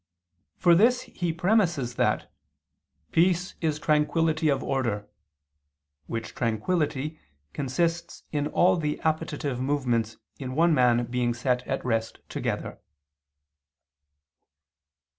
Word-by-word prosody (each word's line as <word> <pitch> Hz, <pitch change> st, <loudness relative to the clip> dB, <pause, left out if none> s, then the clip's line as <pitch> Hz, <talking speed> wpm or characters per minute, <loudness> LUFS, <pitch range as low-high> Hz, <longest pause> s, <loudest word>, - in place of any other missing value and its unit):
For 175 Hz, -2 st, +5 dB
this 240 Hz, +8 st, +4 dB
reason 255 Hz, -, -15 dB
he 175 Hz, -2 st, -1 dB
premises 170 Hz, -, +1 dB
that -, -, 0 dB, 0.8 s
"peace 180 Hz, +1 st, +2 dB
is 155 Hz, -3 st, 0 dB
tranquillity 155 Hz, +1 st, +2 dB
of 140 Hz, -, +1 dB
order," 115 Hz, -6 st, -1 dB, 1.0 s
which 115 Hz, 0 st, -5 dB
tranquillity 145 Hz, +5 st, -1 dB, 0.3 s
consists 165 Hz, +5 st, -2 dB
in 145 Hz, -1 st, 0 dB
all 180 Hz, +4 st, +3 dB
the 150 Hz, -2 st, -2 dB
appetitive 155 Hz, -4 st, -1 dB
movements 125 Hz, -5 st, 0 dB, 0.2 s
in 130 Hz, -1 st, -5 dB
one 165 Hz, +2 st, +4 dB
man 120 Hz, -3 st, +3 dB
being 120 Hz, 0 st, -1 dB
set 125 Hz, 0 st, 0 dB
at -, -, -2 dB
rest 115 Hz, -2 st, -1 dB
together. -, -, -3 dB
150 Hz, 105 wpm, -27 LUFS, 125-170 Hz, 1.0 s, For